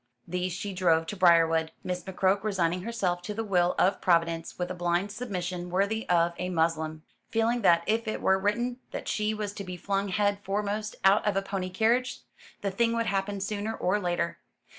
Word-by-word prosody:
These 180 +1 -2
she 200 +2 -4
drove 165 -3 +2
to 205 - -5
Briarwood, 165 -3 +4
Miss 180 0 -3
McCroke 190 +1 +1
resigning 180 -4 0
herself 185 -5 -1
to 205 +4 -5
the 225 - -2
will 180 -4 +2
of 190 +2 +2
Providence 170 -2 +1
with 180 0 -3
a - - -2
blind 175 +3 0
submission 180 -6 -4
worthy 200 +5 0
of 170 -1 +3
a 180 - -2
Moslem; 160 -2 0 0.3
feeling 230 +2 +1
that 170 -4 +5
if 225 +1 0
it 215 - -2
were 190 0 +3
written 240 +5 -1
that - - -6
she 215 0 0
was 210 -1 -4
to 205 - -6
be 180 -1 -6
flung 195 +3 -1
head 205 0 +1
foremost 210 +2 -2
out 195 +2 +6
of 200 -1 +1
a 195 - +1
pony 195 -2 -3
carriage, 230 +7 +1 0.4
the 200 - -1
thing 230 +4 +1
would 230 0 0
happen 200 0 -1
sooner 210 +2 -3
or 190 +1 +1
later. 175 -2 -1
195 Hz, 195 wpm, -28 LUFS, 175-210 Hz, 0.4 s, out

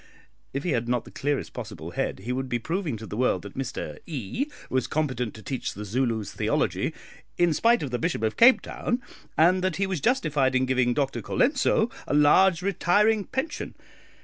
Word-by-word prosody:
If 140 +1 -3
he 175 - 0
had 120 -3 -1
not 125 -1 0
the - - -12
clearest 145 0 -2
possible - - -7
head, - - -2
he 120 +5 -4
would 130 +1 -2
be 120 - +1
proving 160 - -2
to 110 - -8
the 105 - -7
world 125 +3 +1
that - - -9
Mr 130 -2 -5
E 145 - -3 0.2
was 130 -2 0
competent 130 -7 -1
to 110 - -11
teach 130 +2 -4
the 105 - -6
Zulus 115 -1 -1
theology - - 0 0.5
in 175 -2 +3
spite 230 +5 +3
of 135 - -4
the 125 - -1
Bishop 115 - -1
of 110 0 0
Cape 245 +3 +7
Town, 245 - -2 0.4
and 180 +3 +4
that 185 -3 0
he 195 - 0
was 190 -6 -3
justified 150 - +2
in 130 0 +3
giving 125 -2 +1
Dr 135 -2 -1
Colenso 240 -4 +2 0.2
a - - 0
large 170 +4 +5
retiring 205 +2 +2
pension. 265 +5 -4
140 Hz, 195 wpm, -26 LUFS, 125-185 Hz, 0.5 s, Cape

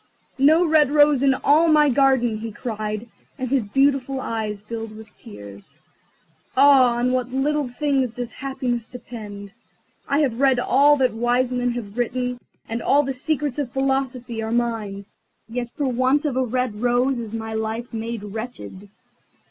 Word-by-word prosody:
"No 315 +6 +5
red 310 -4 +4
rose 290 -2 +4
in 270 -1 +4
all 305 +5 +3
my 305 -2 +5
garden!" 260 -4 +2
he 225 +1 -6
cried, 215 -1 -5 0.3
and 260 -3 -3
his 260 -5 0
beautiful 270 +2 +1
eyes 215 -4 -4
filled 225 0 -6
with 220 -1 -14
tears. 100 - -12 0.8
"Ah, 265 -3 +6
on 245 +1 +1
what 255 -1 -1
little 285 +2 0
things 265 -2 -1
does 245 -1 -5
happiness 260 -4 -3
depend! 210 -5 -9 0.5
I 285 +2 +2
have 255 -5 0
read 270 -2 +4
all 285 +4 +4
that 255 -3 +2
the 220 - -10
wise 245 +2 +1
men 245 -1 0
have 230 -1 -6
written, 250 +1 -2 0.3
and 230 +1 -4
all 285 +5 +3
the 270 -1 -3
secrets 290 +1 -2
of 265 -4 -3
philosophy 265 -3 -2
are 220 0 -4
mine, 225 -4 -2 0.4
yet 240 +1 -4
for 285 +4 -3
want 260 +4 +1
of 285 -4 -1
a 260 - +2
red 245 -3 -2
rose 245 +1 +1
is 225 -3 -6
my 220 0 -5
life 220 +2 -4
made 225 -1 -4
wretched." 210 -2 -8
245 Hz, 165 wpm, -22 LUFS, 225-270 Hz, 0.8 s, Ah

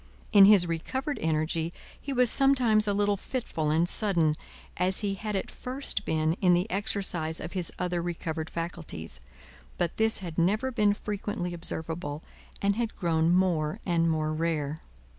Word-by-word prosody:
In 200 -3 +9
his 200 -3 +7
recovered 260 - -3
energy 160 +1 -1 0.3
he 280 - -5
was 250 -3 +5
sometimes 250 -6 +4
a 205 - +2
little 205 0 +1
fitful 190 - -3
and 160 +3 +2
sudden, 175 -6 +3 0.4
as 185 +3 +1
he 200 -2 -1
had 210 +1 -4
at 190 - -3
first 255 -5 -3
been 160 0 +1
in 180 -2 +5
the 175 +3 +1
exercise 185 -5 -1
of 170 - -6
his 180 -3 -1
other 180 -1 -1
recovered 165 -2 -4
faculties; 165 - -6 0.6
but, 170 - -1
this 220 0 +3
had 170 -3 -5
never 215 +10 +1
been 210 -4 +2
frequently 205 -3 -4
observable, 160 -2 -3 0.4
and 200 +1 +2
had 235 -2 -2
grown 165 -2 +1
more 175 -4 +1
and 170 -2 +2
more 155 -1 0
rare. 155 -2 -2
175 Hz, 160 wpm, -28 LUFS, 160-205 Hz, 0.6 s, In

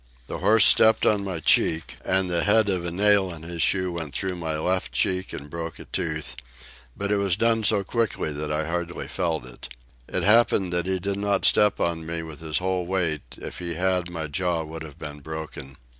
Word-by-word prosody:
The - - -6
horse 110 -1 +5
stepped 110 0 +6
on 105 -2 +3
my 95 -4 -4
cheek, 80 +1 +3
and 95 0 +1
the 85 -1 0
head 105 0 +3
of 90 -3 -1
a - - -2
nail 100 +1 +3
in 80 -2 -10
his 85 0 -5
shoe 95 +3 +2
went 80 -4 -5
through 95 -2 -2
my 80 -3 -3
left 90 -5 -1
cheek 95 +8 +1
and 70 - -7
broke 85 +2 -6
a - - -10
tooth, - - -3 0.6
but 100 +1 -2
it 105 - +3
was 100 -3 +1
done 115 +1 +1
so 105 -1 +3
quickly 110 -6 -1
that 75 +1 -4
I 75 +1 -1
hardly 85 +1 -4
felt 80 -6 -2
it. 60 -1 -10 0.4
It - - -2
happened 105 -4 +3
that 90 +1 0
he 95 0 0
did 100 +2 -3
not 100 -1 0
step 105 -1 +4
on 85 -1 -1
me 85 +1 -4
with 80 -2 -9
his 80 -1 -2
whole 90 -1 -1
weight, 85 -6 0 0.2
if - - -7
he 85 -1 -3
had 90 0 0
my 85 -2 -4
jaw 85 +2 -1
would 80 +1 -8
have 75 -3 -9
been 75 -1 -8
broken. 80 -3 -8
90 Hz, 215 wpm, -25 LUFS, 80-95 Hz, 0.6 s, stepped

